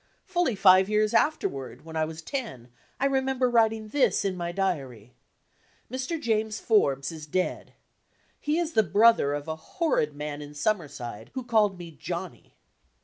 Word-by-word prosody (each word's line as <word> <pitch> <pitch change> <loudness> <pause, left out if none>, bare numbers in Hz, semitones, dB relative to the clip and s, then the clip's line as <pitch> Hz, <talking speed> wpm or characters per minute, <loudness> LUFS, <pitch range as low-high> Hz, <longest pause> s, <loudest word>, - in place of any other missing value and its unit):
Fully 350 - 0
five 190 0 +6
years 215 0 +2
afterward, 135 - 0
when 160 0 -9
I 160 0 +1
was 160 +1 -8
ten, 160 - -5 0.3
I 275 - +1
remember 265 -1 +1
writing 225 -2 +2
this 280 -3 +2
in 190 -1 0
my 175 -1 -3
diary: 135 - -3 0.8
"Mr. 260 +6 -3
James 220 -3 -1
Forbes 140 - +2
is 155 -2 -9
dead. 185 +5 -2 0.6
He 300 +2 0
is 340 -2 -1
the 220 - +5
brother 210 -9 +4
of 145 +1 -6
a 160 - -2 0.2
horrid 255 - +1
man 150 0 -5
in 145 0 -10
Sum 210 +8 +1
merside 120 -8 -8
who 260 -1 -4
called 215 -5 +2
me 175 -2 -9
'Johnny'." 170 +3 -7
190 Hz, 160 wpm, -27 LUFS, 150-235 Hz, 0.8 s, five